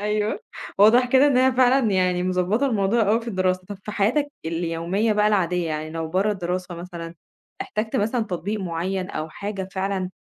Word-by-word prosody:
أيوه، 210 0 -1 0.4
واضح 235 +5 +6
كده 265 +2 +6
إن 280 - +3
هي 260 0 +4
فعلًا 255 -2 +3
يعني 180 -1 +1
مضبطة 185 +8 +1
الموضوع 220 -1 +1
أوي 225 +3 +3
في 230 - -7
الدراسة، 185 -2 0
طَب 205 - -6
في 210 - -5
حياتك 275 +9 +1
اليومية 170 +6 -1
بقى 210 0 +2
العادية، 180 -4 +1
يعني 155 0 -4
لو 160 0 -4
برَّا 195 +5 +1
الدراسة 180 -1 -4
مثلًا، 170 -1 -8 0.5
احتجت 215 +2 -3
مثلًا 225 +4 0
تطبيق 200 +2 -3
معيّن 185 +2 -3
أو 155 +1 -4
حاجة 195 +2 -5
فعلًا 190 -1 -2
195 Hz, 175 wpm, -23 LUFS, 180-220 Hz, 0.5 s, واضح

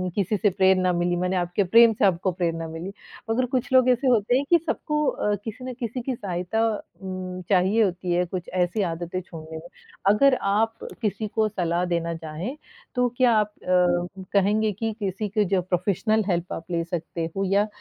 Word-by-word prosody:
किसी 205 +1 0
से 205 +1 +3
प्रेरणा 190 -1 +3
मिली 175 0 0
माने 180 +1 -1
आपके 175 +3 0
प्रेम 230 +4 +6
से 205 - +1
आपको 185 0 +2
प्रेरणा 165 -2 -2
मिली। 165 +4 -6 0.4
मगर 250 +3 +2
कुछ 250 0 -1
लोग 255 -1 +6
ऐसे 250 +2 +2
होते 240 0 +3
हैं 280 - 0
कि 345 - +7
सबको 300 -1 -1
अ, 210 - -1
किसी 225 +3 -6
न 255 - -4
किसी 240 +1 -3
की 255 0 -3
सहायता 185 +2 -2
अ, 215 - -3 0.7
चाहिए 195 +4 +3
होती 180 -2 -1
है 180 +1 +2
कुछ 180 0 -6
ऐसी 180 +4 0
आदतें 170 +2 -4
छोड़ने 160 -2 -9
में। 165 +2 -10 0.5
अगर 265 +5 +5 0.2
आप 225 +2 +1 0.2
किसी 215 0 -1
को 215 +1 +1
सलाह 175 -3 -1
देना 170 0 -2
चाहें 165 - -6 0.4
तो 250 0 +3
क्या 250 -2 +5
आप 210 0 0
अ, 180 +1 +1
कहेंगे 210 +2 +2
कि 220 +2 -3
किसी 200 +1 -2
की 210 0 +1
जो 185 - +2
प्रोफ़ेशनल 195 +4 0
हेल्प 175 0 -1
आप 165 - -6
ले 170 -1 0
सकते 165 -1 -4
हो। 195 - +1
या 205 +1 +3
195 Hz, 190 wpm, -24 LUFS, 175-220 Hz, 0.7 s, कि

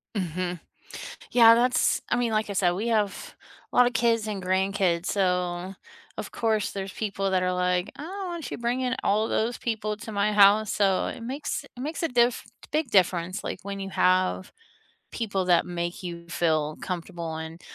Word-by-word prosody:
Mhm. 180 -1 -2 0.7
Yeah, 230 -2 +8
that's 250 +2 +2
I - - +2
mean, 240 -2 0
like 215 -1 0
I - - -2
said, 180 -2 +3
we 205 +6 -2
have 215 -3 -1 0.4
a - - -9
lot 250 - +7
of 245 - 0
kids 230 -1 +2
and 205 -3 -3
grandkids, 185 -1 +1
so, 180 -1 0 0.4
of - - -5
course, 220 -3 0
there's 195 -1 -5
people 195 -2 -2
that 185 -1 +2
are 180 - +1
like, 180 +1 0
"Oh, 375 +5 -5
whatcha 340 -5 -6
you - - -11
bringing 250 +2 -1
all 215 +2 +2
those 230 +2 0
people 215 -2 -2
to 220 +1 -8
my 205 +1 +1
house." 205 +1 +5
So 195 -2 +2
it - - -6
makes 275 +3 -4
it 250 - -12
makes 310 +5 -4
a 330 - +1
diff 240 0 +2 0.3
big 305 -3 0
difference, 180 -1 +2
like, - - -4
when 200 0 -5
you 195 - -5
have 185 0 +1 0.6
people 200 -5 -2
that 175 -1 +4
make 175 0 -4
you 170 -1 -7
feel 155 -3 0
comfortable 170 -3 -4
and 160 +2 -7
200 Hz, 185 wpm, -26 LUFS, 180-230 Hz, 0.7 s, Yeah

